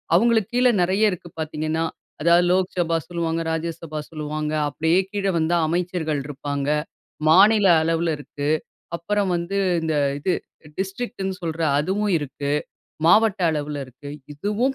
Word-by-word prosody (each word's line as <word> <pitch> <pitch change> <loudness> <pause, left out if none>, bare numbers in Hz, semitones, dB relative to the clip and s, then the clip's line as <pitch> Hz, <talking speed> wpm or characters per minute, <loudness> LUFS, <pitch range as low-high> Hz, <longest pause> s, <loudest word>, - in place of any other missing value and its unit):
அவங்களுக்கு 225 +1 +3
கீழே 250 0 +5
நெறைய 195 +4 +3
இருக்கு 175 -1 -7
பார்த்தீங்கன்னா. 155 +1 -2 0.4
அதாவது 170 +2 +5
லோக்சபா 180 -3 +1
சொல்லுவாங்க, 165 -1 -1
ராஜ்யசபா 160 -1 -4
சொல்லுவாங்க, 155 0 -3 0.2
அப்படியே 160 +5 +2
கீழே 195 -2 0
வந்தா 165 +2 +2
அமைச்சர்கள் 170 -3 -1
இருப்பாங்க. 140 0 -4 0.6
மாநில 205 +4 +6 0.2
அளவுல 165 0 +1
இருக்கு. 145 0 -4 0.5
அப்பறம் 200 +2 -1
வந்து 175 +4 -2 0.2
இந்த 160 -1 0 0.3
இது 185 - 0 0.5
டிஸ்ட்ரிக்ட்ன்னு 195 -1 -3
சொல்ற 165 0 -3 0.2
அதுவும் 195 +6 0
இருக்கு, 140 0 -4 0.6
மாவட்ட 215 -2 +4
அளவிலருக்கு. 145 -3 -5 0.3
இதுவும் 210 - 0
170 Hz, 120 wpm, -23 LUFS, 155-195 Hz, 0.6 s, மாநில